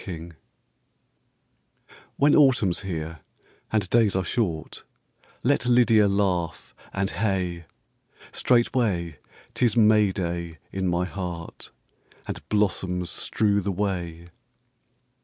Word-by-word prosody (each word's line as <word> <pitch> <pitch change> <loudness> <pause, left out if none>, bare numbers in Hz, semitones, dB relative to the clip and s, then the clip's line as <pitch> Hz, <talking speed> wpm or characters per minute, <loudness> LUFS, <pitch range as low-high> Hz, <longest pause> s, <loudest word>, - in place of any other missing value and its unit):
Lydia. 85 -2 -7 1.9
When 145 +1 +4
Autumn's 125 - +4
here 80 -4 -5 0.5
and 105 -3 +1
days 115 -5 +3
are 95 - +1
short, 85 - -3 0.6
Let 135 -1 +2
LYDIA 115 -4 +5
laugh 95 -4 -1 0.2
and, 95 0 -1
hey! 90 -4 -2 0.7
Straightway 110 - +1 0.3
't - - -2
is 120 -1 +2
May 105 -2 +5
day 85 -3 -4
in 95 -1 -2
my 90 0 +1
heart, 90 -3 -7 0.6
And - - -5
blossoms 95 -4 0
strew 100 -2 +1
the 100 +1 -2
way. 85 -4 -3
95 Hz, 100 wpm, -25 LUFS, 85-110 Hz, 1.9 s, LYDIA